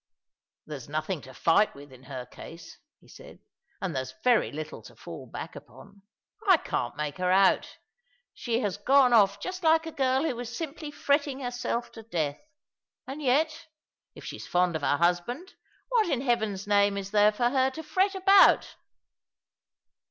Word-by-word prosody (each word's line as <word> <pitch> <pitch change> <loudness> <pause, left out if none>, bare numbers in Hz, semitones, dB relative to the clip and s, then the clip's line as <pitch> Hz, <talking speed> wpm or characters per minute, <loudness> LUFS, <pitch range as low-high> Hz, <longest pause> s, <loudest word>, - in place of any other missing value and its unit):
*' - - -66
There's 145 -4 -8
nothing 155 +2 -3
to 130 0 -13
fight 190 +10 +3
with 140 0 -13
in 130 0 -16
her 130 -2 -7
case," 165 +6 -12 0.2
he - - -22
said, - - -14 0.4
"and 180 -6 -4
there's 130 0 -4
very 245 -3 +3
little 155 +1 -7
to - - -15
fall - - -10
back - - -8
upon. 200 - -14 0.5
I 375 -3 +7
can't 120 - -3
make 150 +2 -4
her 180 0 0
out. 190 0 +3 0.6
She 235 0 -2
has 205 -5 -2
gone 260 +3 +4
off 200 -3 +4
just 370 - -5
like 320 -1 +3
a 325 - -5
girl 265 -1 +1
who 320 - -1
was 240 0 -6
simply 310 -1 -6
fretting 285 -1 0
herself 245 -1 -3
to 225 - -11
death; 160 -10 -3 0.6
and 275 +3 -7
yet, 310 +5 0 0.5
if - - -12
she's - - -7
fond 180 -1 +1
of 160 - -2
her 145 - +1
husband, 180 - -1 0.4
what 460 -6 +2
in 260 -5 0
Heaven's 220 -6 -1
name 200 -1 +3
is 200 0 -5
there 210 0 +5
for 240 +3 0
her 260 -1 +2
to 315 +5 -8
fret 385 +5 +1
about 385 +1 +5
225 Hz, 175 wpm, -27 LUFS, 175-280 Hz, 0.6 s, I